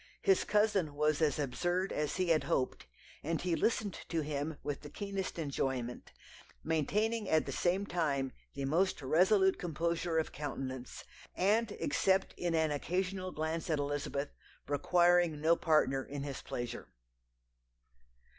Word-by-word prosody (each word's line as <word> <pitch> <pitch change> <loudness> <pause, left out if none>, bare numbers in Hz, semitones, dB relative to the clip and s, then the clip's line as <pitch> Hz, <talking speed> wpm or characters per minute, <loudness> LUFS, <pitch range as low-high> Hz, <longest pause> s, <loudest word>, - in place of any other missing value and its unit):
His 390 - +4
cousin 205 -8 +2
was 150 +1 +1
as 150 -4 +2
absurd 175 +7 -1
as 150 -1 -1
he 185 -1 0
had 160 -2 +3
hoped, 130 - -1 0.3
and 165 +2 -1
he 175 -2 0
listened 210 0 0 0.2
to 165 -2 0
him 150 +1 -3
with 145 -1 -3
the 145 - -9
keenest 195 +1 -4
enjoyment, 130 -5 -3 0.5
maintaining 210 +8 0
at 160 0 +3
the - - -4
same 185 +3 +1
time 140 -7 0 0.2
the 140 0 -2
most 165 +2 +1
resolute 190 +7 +4
composure 170 0 -1
of 160 - 0
countenance, 130 -3 -5 0.3
and 210 +4 +2
except 190 -9 +1
in 175 -2 -1
an 160 -1 +2
occasional 185 +5 -2
glance 160 +1 -3
at 155 - +2
Elizabeth, 145 0 -2 0.4
requiring 175 +2 +3
no 160 +2 +4
partner 150 -6 +2
in 140 +1 -6
his 140 -2 -5
pleasure. 120 -1 -5
160 Hz, 140 wpm, -33 LUFS, 145-185 Hz, 0.5 s, His